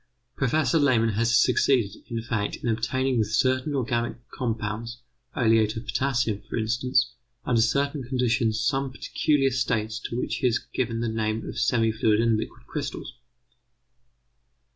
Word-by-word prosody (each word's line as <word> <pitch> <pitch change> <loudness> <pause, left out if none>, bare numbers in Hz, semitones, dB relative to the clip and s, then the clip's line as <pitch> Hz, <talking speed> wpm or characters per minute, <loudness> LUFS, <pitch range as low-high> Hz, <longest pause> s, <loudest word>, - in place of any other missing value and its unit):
Professor 140 +3 +2
Lehmann 125 -6 +3
has 115 +3 +3
succeeded, 115 -7 +2
in 115 -1 -3
fact, 115 -3 -2
in - - -6
obtaining 125 +3 0
with 110 -1 0
certain 130 +3 +1
organic 120 -2 -1 0.2
compounds 115 0 -4 0.3
oleate 110 -2 +3
of 115 - -6
potassium, 120 -5 0
for - - -3
instance 120 +2 +1 0.3
under 115 -2 +3
certain 140 +5 +1
conditions 120 -3 0
some 135 +2 0
peculiar 135 +1 +1
states 115 -3 -1
to 120 - -5
which - - -2
he 130 - +1
has 120 - +2
given 115 -2 -3
the 120 - -1
name 110 0 -2
of - - -5
semi 115 -2 +2
fluid 110 -1 +2
and 115 -1 +3
liquid 115 +2 -5
crystals. 145 0 -5
120 Hz, 145 wpm, -26 LUFS, 110-130 Hz, 0.3 s, Lehmann